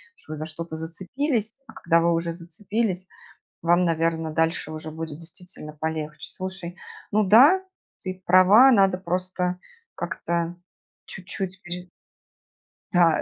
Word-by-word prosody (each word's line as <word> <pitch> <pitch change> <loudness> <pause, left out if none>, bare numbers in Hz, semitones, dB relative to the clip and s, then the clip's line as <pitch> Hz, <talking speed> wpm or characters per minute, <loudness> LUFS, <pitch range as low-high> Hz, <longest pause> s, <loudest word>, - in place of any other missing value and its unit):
что 155 - -10
вы - - -4
за 155 - -4
что-то 160 0 -6
зацепились, 215 - -2
а - - -13
когда 170 0 +2
вы 170 0 +3
уже 165 0 -1
зацепились, 185 +3 -2 0.6
вам, 175 +2 +4
наверно, 165 -1 0
дальше 165 0 0
уже 155 0 -6
будет 160 -1 -6
действительно 165 -2 -6
полегче. 155 0 -4
Слушай, 185 -2 -6 0.3
ну 215 +1 +3
да, 275 - +7 0.4
ты 185 0 -6
права, 195 +9 +8
надо 195 -5 +4
просто 180 0 -1 0.4
как-то 170 0 -2 0.5
чуть-чуть 185 0 -5
пере 180 +1 -6 1.0
Да, 170 -3 +5
175 Hz, 125 wpm, -25 LUFS, 165-190 Hz, 1.0 s, права